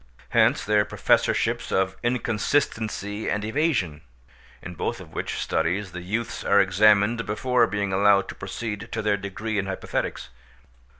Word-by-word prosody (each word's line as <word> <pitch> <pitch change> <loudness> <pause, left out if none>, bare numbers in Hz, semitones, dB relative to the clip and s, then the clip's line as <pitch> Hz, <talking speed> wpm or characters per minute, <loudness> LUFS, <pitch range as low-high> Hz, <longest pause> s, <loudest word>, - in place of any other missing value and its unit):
Hence - - +3
their 105 0 +3
professorships - - +1
of 95 0 +1
Inconsistency 110 -3 -1
and 105 0 -1
Evasion, 110 - 0 0.6
in 90 - -7
both 85 - -3
of - - -12
which - - -3
studies 90 +4 -1
the 90 - -7
youths 115 +6 -3
are 100 - +4
examined 105 +4 +4
before 120 +3 +2
being 100 -1 -2
allowed 100 0 +4
to - - -5
proceed 110 -1 -6
to 110 - -2
their 105 -1 +2
degree 100 +2 -3
in 95 - -2
hypothetics. 95 -8 -3
105 Hz, 140 wpm, -25 LUFS, 95-110 Hz, 0.6 s, are